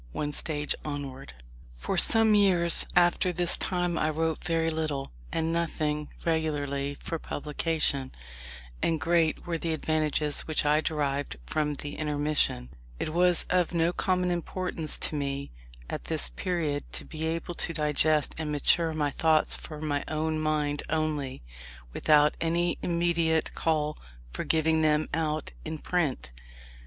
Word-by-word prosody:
ONE 150 0 -2
STAGE 150 0 0
ONWARD 140 - -6 0.4
For - - -3
some 225 -1 +6
years 185 -5 +4
after 175 +1 +3
this 175 0 +4
time 175 -2 -1
I 155 - +1
wrote 160 +1 -1
very 165 -1 0
little, 155 -4 -3 0.2
and 165 0 -1
nothing 155 -3 -1 0.2
regularly, 145 -4 -1
for 165 - -4
publication: 150 -3 -1 0.7
and 165 -1 +1
great 165 0 +1
were 170 -2 -2
the 165 0 -1
advantages 155 -1 0
which 155 -1 0
I 150 +1 +3
derived 145 - -2
from 150 - -1
the 145 +1 -6
intermission. 150 - 0 0.3
It - - -2
was 175 +2 +3
of 180 -1 +1
no 170 +1 +2
common 180 -1 0
importance 175 -2 -1
to 155 - 0
me, 140 -1 -3 0.4
at - - -5
this - - -1
period, 150 - -2
to - - -3
be 160 0 -4
able 165 +1 -3
to 165 - 0
digest 150 -1 +1
and 155 -2 -3
mature 160 +3 +2
my 150 -2 0
thoughts 155 +1 +3
for 155 -2 -7
my 145 -2 -1
own 155 0 -1
mind 150 -2 0
only, 150 - -2 0.5
without 150 -1 +4
any 170 +1 0
immediate 170 -2 +1
call 150 -2 -1 0.3
for - - -4
giving 160 0 +2
them 155 0 +2
out 155 -1 -1
in 160 0 -5
print. 155 - -2
155 Hz, 145 wpm, -28 LUFS, 150-165 Hz, 0.7 s, some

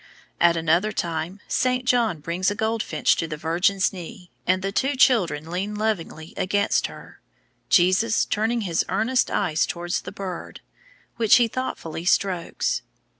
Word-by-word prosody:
At 170 -1 +4
another 165 +6 +2
time 170 +1 -3
Saint 255 0 0
John 235 -10 +2
brings 175 +5 0
a 205 - -3
goldfinch 220 -7 +1
to 165 - -1
the 155 -1 -5
Virgin's 180 +6 +1
knee, 180 -1 -10 0.2
and 185 +1 +2
the 195 - -1
two 270 +7 0
children 170 - +2
lean 195 +4 -3
lovingly 185 -7 -3
against 200 +2 +1
her, - - -13 0.5
Jesus 185 +6 +3
turning 225 +3 0
his 175 -5 0
earnest 250 +4 +1
eyes 170 -6 +1
towards 175 0 -3
the - - -8
bird, 185 -3 -7 0.6
which 225 -2 +5
he 240 -2 +4
thoughtfully 210 -10 -5
strokes. 180 -2 0
190 Hz, 145 wpm, -24 LUFS, 170-220 Hz, 0.6 s, which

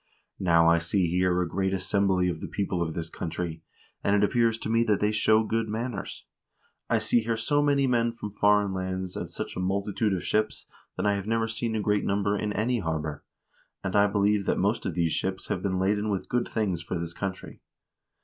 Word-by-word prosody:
Now 85 -3 +4
I 85 0 +5
see 90 +3 +1
here 90 +1 +1
a - - -3
great 95 +2 0
assembly 95 -1 +1
of 85 -3 -3
the - - -4
people 95 -3 -2
of 80 -2 -2
this 80 -1 -3
country, 80 -1 -4 0.4
and 100 - +3
it 105 - +3
appears 115 +1 +2
to - - -6
me 115 +1 +3
that 105 -3 +2
they 105 0 +2
show 110 +1 +3
good 110 0 -1
manners. 110 -1 -4 0.6
I - - +3
see 120 - +2
here 115 0 -1
so 145 +6 +1
many 140 -1 +3
men 120 -2 +2
from 105 -3 -7
foreign 105 -1 +3
lands 95 -1 -3
and - - -4
such - - -6
a - - -4
multitude 100 +2 0
of 90 - -4
ships 110 0 0 0.3
that - - -1
I 105 - +3
have 100 0 -3
never 115 0 +1
seen 115 0 -3
a 110 - 0
greater 105 0 +1
number 100 +1 +1
in 105 0 -2
any 120 +3 0
harbor; 80 -4 -3 0.6
and 95 -1 -2
I 100 0 +5
believe 100 0 +1
that - - +2
most - - 0
of - - -3
these 85 -2 +1
ships 95 +3 -2
have 90 - -1
been 95 -1 -1
laden 105 +3 +1
with 100 -2 -2
good 120 0 0
things 100 -7 -1
for 85 +2 -4
this 85 0 -5
country. 95 +1 -6
100 Hz, 215 wpm, -27 LUFS, 90-110 Hz, 0.6 s, I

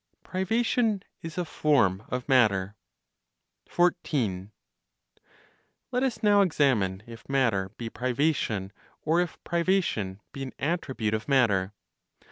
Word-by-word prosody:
PRIVATION 220 +2 0 0.2
IS 165 +1 -8
A 180 - -1
FORM 130 - +2
OF 125 -1 -3
MATTER. 105 -7 +3 0.9
14. 115 - 0 1.4
Let 250 0 0
us 260 -4 -1
now 205 -1 +5
examine 120 - +1
if 115 +1 -12
matter 115 -9 +1
be 115 - -5
privation, 125 -5 -1 0.3
or 165 +3 +3
if 180 - -3
privation 170 - 0
be 135 - -8
an 135 -1 -5
attribute 130 -8 -2
of 110 0 -2
matter. 105 -8 +2
130 Hz, 110 wpm, -27 LUFS, 105-175 Hz, 1.4 s, now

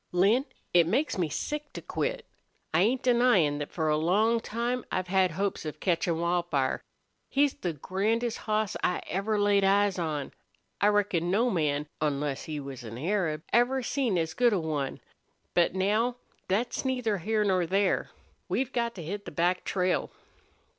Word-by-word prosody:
"Lin, 205 +9 +3 0.3
it 170 -2 +5
makes 255 - 0
me 170 -4 +1
sick 295 - -4
to - - -5
quit. - - -2 0.5
I 160 - +4
ain't 245 +6 +2
denyin' 235 - +3
thet 145 - -4
for 160 -2 -2
a 150 0 +3
long 210 +9 +3
time 235 +2 -2
I've 185 -1 -2
had 190 -1 +3
hopes 195 +4 -2
of 155 -1 -6
ketchin' 170 -2 0
Wildfire. 170 -6 0 0.5
He's 285 0 +3
the 175 -2 -3
grandest 215 - -1
hoss 215 -1 +1
I 180 - 0
ever 205 +3 -1
laid 205 -1 +3
eyes 195 -1 +3
on. 150 -4 -2 0.5
I 205 - +5
reckon 200 -5 +2
no 230 +6 +2
man, 150 -5 0 0.2
onless 145 -2 -1
he 155 -2 -4
was 135 -3 -7
an 115 0 -7
Arab, 160 -1 -1
ever 245 +3 +3
seen 245 -6 0
as 160 -1 -1
good 245 -2 +3
a 195 - +2
one. 150 -4 -3 0.5
But 175 +1 +3
now 215 +6 +1 0.3
thet's 225 +6 0
neither 250 -6 0
here 215 +4 +1
nor 185 -4 +2
there.... 195 +2 +1 0.4
We've 265 0 -1
got 235 -1 -1
to 175 - -7
hit 200 +6 -5
the - - -7
back 180 +2 +1
trail." 185 -1 0
190 Hz, 170 wpm, -28 LUFS, 165-230 Hz, 0.5 s, it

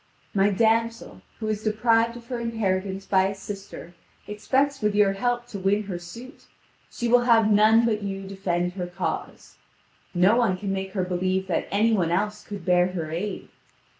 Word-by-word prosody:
My 200 -1 +3
damsel, 225 - 0 0.2
who 220 - -4
is 215 -1 -2
deprived 225 +2 +2
of 235 - -13
her 245 0 -4
inheritance 195 -4 -2
by 190 0 +3
a 195 - -4
sister, 195 -3 -9 0.3
expects 265 +7 0
with 210 -1 +1
your 205 -2 +4
help 240 +4 -1
to 200 - -6
win 200 +3 +1
her 190 -4 -5
suit; 235 - -12 0.4
she 240 - -3
will 240 +1 +4
have 225 -3 +4
none 215 +2 +5
but 215 -2 0
you 195 -1 -4
defend 180 -2 -2
her 180 -2 -4
cause. 175 -2 -5 0.6
No 190 +6 +4
one 225 -7 +2
can 195 0 -3
make 190 0 -4
her 190 -3 0
believe 185 +1 -1
that 175 - -1
any 220 +3 +2
one 180 -6 +1
else 210 +4 -1
could 200 -4 -8
bear 180 0 +4
her 160 -4 -4
aid. 190 +6 -4
200 Hz, 180 wpm, -25 LUFS, 185-225 Hz, 0.6 s, none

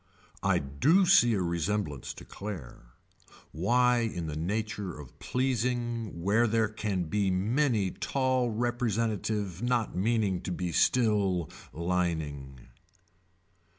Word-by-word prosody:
I - - +2
do 140 - +3
see 175 - +5
a 95 - 0
resemblance 85 -4 -2
to - - -11
Claire. 75 - -8 0.6
Why 120 - +3
in 110 -8 -2
the 75 -1 -4
nature 100 0 -3
of 70 -4 -12
pleasing 120 -6 -1
where 110 +5 +3
there 110 0 +2
can 105 -4 -2
be 95 +4 0
many 105 +1 +1
tall 130 -2 0
representative 110 -4 -1
not 120 -4 0
meaning 100 -2 +1
to 90 - -5
be 90 0 -2
still 100 -7 +2 0.2
lining. 80 -7 -3
105 Hz, 115 wpm, -29 LUFS, 85-120 Hz, 0.6 s, see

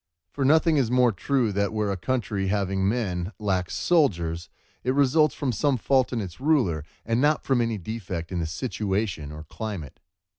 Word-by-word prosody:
For 140 - -2
nothing 160 +3 +4
is 130 -5 +2
more 125 -1 +4
true 120 +3 0
than 100 +1 0
that 100 +1 0
where 105 -2 0
a - - -1
country, 100 -2 -1
having 95 -1 +1
men, 100 -4 -2
lacks 95 -4 -1
soldiers, 85 - +1 0.3
it 130 +2 0
results 145 +1 +4
from 135 -3 -1
some 135 +4 +1
fault 130 +2 +2
in 120 -3 -1
its 90 +1 -8
ruler, 125 - +2 0.2
and 115 +2 +1
not 150 +1 +2
from 130 -3 +2
any 115 -2 0
defect 90 -4 -5
in 90 - -1
the 80 - -1
situation 95 - -2
or 75 +1 -8
climate. 80 - -6
110 Hz, 185 wpm, -25 LUFS, 90-130 Hz, 0.3 s, nothing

